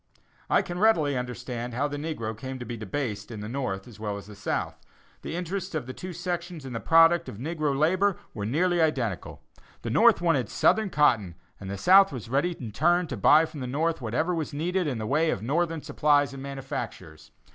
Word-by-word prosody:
I -, -, +4 dB
can 175 Hz, 0 st, -5 dB
readily 165 Hz, -10 st, +3 dB
understand 125 Hz, -1 st, -4 dB
how 140 Hz, +4 st, +1 dB
the 145 Hz, -, -5 dB
negro 145 Hz, -8 st, -3 dB
has -, -, -15 dB
come 130 Hz, +2 st, -6 dB
to 120 Hz, -, -7 dB
be 120 Hz, -, -5 dB
debased 110 Hz, -1 st, -4 dB
at 110 Hz, -, -6 dB
the 105 Hz, -, -6 dB
North 115 Hz, -6 st, -3 dB
as 110 Hz, -4 st, -13 dB
well 105 Hz, -2 st, -3 dB
as 100 Hz, -, -8 dB
at 100 Hz, -, -16 dB
the 105 Hz, -, -10 dB
South. -, -, -2 dB, 0.4 s
The -, -, -5 dB
interests 180 Hz, +1 st, -4 dB
of 155 Hz, -, -2 dB
the 130 Hz, -, -7 dB
two 185 Hz, +5 st, -7 dB
sections 175 Hz, -3 st, -4 dB
in 130 Hz, -, -6 dB
the 115 Hz, -, -3 dB
product 165 Hz, +3 st, +5 dB
of -, -, -9 dB
negro 150 Hz, +1 st, -2 dB
labor 185 Hz, +6 st, +2 dB, 0.2 s
were 105 Hz, -2 st, -4 dB
nearly 175 Hz, +7 st, +2 dB
identical. 125 Hz, -, -1 dB, 0.4 s
The -, -, -3 dB
North -, -, +5 dB
wanted 165 Hz, -10 st, +1 dB
Southern 220 Hz, -2 st, +2 dB
cotton 115 Hz, -, +2 dB, 0.2 s
and 95 Hz, -, -7 dB
the 100 Hz, -, -4 dB
South 190 Hz, -, +6 dB
was 120 Hz, -5 st, -7 dB
ready 145 Hz, +8 st, +1 dB
in 115 Hz, -4 st, -6 dB
turn 175 Hz, -, +2 dB
to -, -, -3 dB
buy 155 Hz, +2 st, +5 dB
from 155 Hz, -, -9 dB
the 130 Hz, -, -4 dB
North 160 Hz, +4 st, -1 dB
whatever 140 Hz, +10 st, -1 dB
was 160 Hz, -3 st, -3 dB
needed 175 Hz, +3 st, 0 dB
in 130 Hz, -5 st, -2 dB
the 110 Hz, -, -4 dB
way 155 Hz, +7 st, +2 dB
of 105 Hz, -, -2 dB
Northern 165 Hz, +4 st, -1 dB
supplies 145 Hz, -2 st, +2 dB
and 135 Hz, -, -8 dB
manufactures. 120 Hz, -, -7 dB
145 Hz, 220 wpm, -27 LUFS, 115-165 Hz, 0.4 s, South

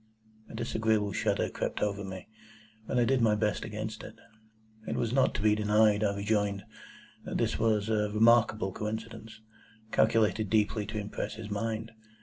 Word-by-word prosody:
A -, -, -9 dB
disagreeable 110 Hz, -2 st, 0 dB
shudder -, -, 0 dB
crept -, -, -3 dB
over 100 Hz, -1 st, -1 dB
me, 95 Hz, -1 st, -8 dB, 0.6 s
but 130 Hz, -, -1 dB
I 120 Hz, -, +4 dB
did 130 Hz, 0 st, +2 dB
my 110 Hz, -2 st, +4 dB
best 105 Hz, 0 st, -1 dB
against 110 Hz, 0 st, -5 dB
it. -, -, -10 dB, 0.7 s
It -, -, -2 dB
was 115 Hz, 0 st, -1 dB
not 135 Hz, 0 st, +2 dB
to 105 Hz, -, -2 dB
be 105 Hz, -1 st, +5 dB
denied, 105 Hz, 0 st, +3 dB
I 100 Hz, -1 st, +1 dB
rejoined, 100 Hz, -1 st, 0 dB, 0.6 s
that -, -, -4 dB
this -, -, 0 dB
was 110 Hz, -2 st, +1 dB
a 105 Hz, -1 st, +1 dB
remarkable 110 Hz, -2 st, +4 dB
coincidence, 110 Hz, +1 st, -6 dB, 0.5 s
calculated 110 Hz, -2 st, +2 dB
deeply 105 Hz, -1 st, +1 dB
to 110 Hz, 0 st, -5 dB
impress 105 Hz, 0 st, -4 dB
his 110 Hz, -1 st, -8 dB
mind. 110 Hz, +2 st, -3 dB
110 Hz, 160 wpm, -29 LUFS, 105-110 Hz, 0.7 s, be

